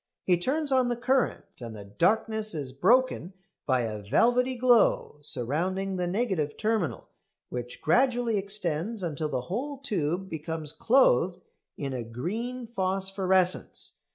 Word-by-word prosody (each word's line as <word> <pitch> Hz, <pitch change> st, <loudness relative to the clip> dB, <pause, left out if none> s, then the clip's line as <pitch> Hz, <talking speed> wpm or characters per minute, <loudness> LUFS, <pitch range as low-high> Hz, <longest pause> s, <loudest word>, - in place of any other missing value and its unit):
He 180 Hz, -, +4 dB
turns 280 Hz, -, -1 dB
on 260 Hz, -2 st, +3 dB
the 240 Hz, -, 0 dB
current 255 Hz, +2 st, +1 dB
and 115 Hz, -3 st, -7 dB
the 100 Hz, -1 st, -9 dB
darkness 215 Hz, -, +1 dB
is 140 Hz, -4 st, -3 dB
broken 195 Hz, -, +2 dB, 0.3 s
by 130 Hz, -3 st, +3 dB
a 110 Hz, -2 st, -3 dB
velvety 245 Hz, -, +2 dB
glow 240 Hz, -10 st, +3 dB
surrounding 180 Hz, +9 st, -1 dB
the 180 Hz, -1 st, -1 dB
negative 185 Hz, -7 st, -1 dB
terminal, 215 Hz, -6 st, -1 dB, 0.4 s
which 125 Hz, 0 st, -6 dB
gradually 240 Hz, -, +2 dB
extends 195 Hz, 0 st, -2 dB
until 155 Hz, -2 st, -2 dB
the 130 Hz, -, -1 dB
whole 255 Hz, -, -4 dB
tube 190 Hz, -, -2 dB
becomes 160 Hz, -2 st, -3 dB
clothed 190 Hz, -, +3 dB, 0.4 s
in 140 Hz, -2 st, -3 dB
a 125 Hz, -, -3 dB
green 220 Hz, -, -4 dB
phosphorescence. 190 Hz, -3 st, 0 dB
190 Hz, 130 wpm, -28 LUFS, 150-235 Hz, 0.4 s, He